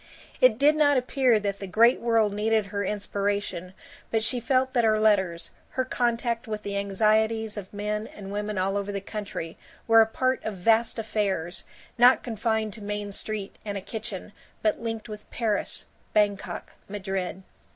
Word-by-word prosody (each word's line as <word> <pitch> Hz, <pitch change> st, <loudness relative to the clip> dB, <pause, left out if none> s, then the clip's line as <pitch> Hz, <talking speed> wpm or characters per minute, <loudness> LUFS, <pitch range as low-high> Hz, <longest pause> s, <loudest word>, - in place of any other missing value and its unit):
It 255 Hz, -4 st, +6 dB
did 290 Hz, +4 st, +5 dB
not 290 Hz, -2 st, +4 dB
appear 250 Hz, -2 st, +3 dB
that 200 Hz, -1 st, -3 dB
the 195 Hz, -, -5 dB
Great 230 Hz, +6 st, +5 dB
World 225 Hz, -3 st, +2 dB
needed 215 Hz, +1 st, +1 dB
her 200 Hz, 0 st, -3 dB
inspiration, 200 Hz, -2 st, -2 dB, 0.3 s
but 225 Hz, -1 st, +1 dB
she 245 Hz, +2 st, +1 dB
felt 260 Hz, +2 st, +1 dB
that 240 Hz, -, +3 dB
her 215 Hz, -1 st, +3 dB
letters, 190 Hz, -6 st, +2 dB, 0.3 s
her 260 Hz, -, +2 dB
contact 235 Hz, -1 st, 0 dB
with 215 Hz, -1 st, -4 dB
the 200 Hz, 0 st, -4 dB
anxieties 215 Hz, +2 st, +1 dB
of 200 Hz, -3 st, -7 dB
men 210 Hz, +1 st, -3 dB
and 195 Hz, -1 st, -9 dB
women 210 Hz, 0 st, -3 dB
all 195 Hz, +2 st, +1 dB
over 200 Hz, 0 st, -2 dB
the 200 Hz, -, -2 dB
country, 200 Hz, -5 st, -6 dB, 0.3 s
were 225 Hz, -1 st, +8 dB
a 220 Hz, -, +4 dB
part 255 Hz, +3 st, 0 dB
of 220 Hz, -, -3 dB
vast 225 Hz, +6 st, +3 dB
affairs, 200 Hz, -6 st, -2 dB, 0.3 s
not 245 Hz, +2 st, +6 dB
confined 220 Hz, -2 st, -1 dB
to 215 Hz, -, -10 dB
Main 205 Hz, 0 st, -4 dB
Street 205 Hz, 0 st, -4 dB
and 205 Hz, -2 st, -3 dB
a -, -, -2 dB
kitchen 210 Hz, -1 st, -6 dB, 0.3 s
but 215 Hz, +1 st, +1 dB
linked 225 Hz, -1 st, -4 dB
with 210 Hz, -1 st, -9 dB
Paris, 220 Hz, -4 st, -1 dB, 0.3 s
Bangkok, 205 Hz, -1 st, 0 dB, 0.2 s
Madrid. 195 Hz, -2 st, -3 dB
215 Hz, 170 wpm, -26 LUFS, 200-230 Hz, 0.3 s, were